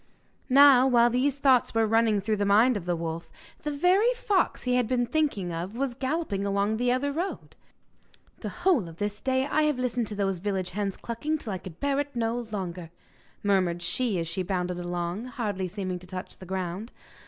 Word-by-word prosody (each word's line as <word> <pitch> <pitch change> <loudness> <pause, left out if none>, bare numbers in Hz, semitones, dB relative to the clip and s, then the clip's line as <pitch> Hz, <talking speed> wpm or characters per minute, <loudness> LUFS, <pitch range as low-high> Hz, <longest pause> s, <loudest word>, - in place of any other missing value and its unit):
Now, 270 -1 +7
while 240 -2 +4
these 265 +3 +1
thoughts 265 -5 +3
were 225 0 +4
running 220 -1 +3
through 215 +2 0
the 205 - 0
mind 225 +5 +5
of 195 -5 -4
the 175 - +1
wolf, 165 0 -5 0.3
the 300 - -3
very 360 +10 +3
fox 415 -6 0
he 250 - 0
had 250 -2 +2
been 245 0 +1
thinking 235 - -1
of 180 +7 -5
was 270 -1 -1
galloping 260 -5 -2
along 200 +2 0
the 245 +1 +1
other 270 +3 0
road. 345 +7 -4 0.8
'The - - -4
whole 350 - +1
of 165 - -13
this 205 +1 -3
day 260 0 +1
I 305 +2 +1
have 300 -3 +1
listened 250 -2 -1
to 210 - -5
those 195 -3 -1
village 190 -1 -2
hens 200 0 -2
clucking 295 +7 -2
till 220 -9 -5
I 185 - -4
could 175 -3 -11
bear 280 0 0
it 285 -2 -3
no 230 0 0
longer,' 180 -5 -5 0.5
murmured 185 -4 +1
she 235 0 0
as 165 -1 -2
she 170 +3 -2
bounded 180 -1 -2
along, 175 +4 -3
hardly 210 -7 -3
seeming 185 -1 -4
to 180 - -14
touch 185 0 -7
the 185 - -12
ground. 190 +4 -4
220 Hz, 200 wpm, -27 LUFS, 185-260 Hz, 0.8 s, Now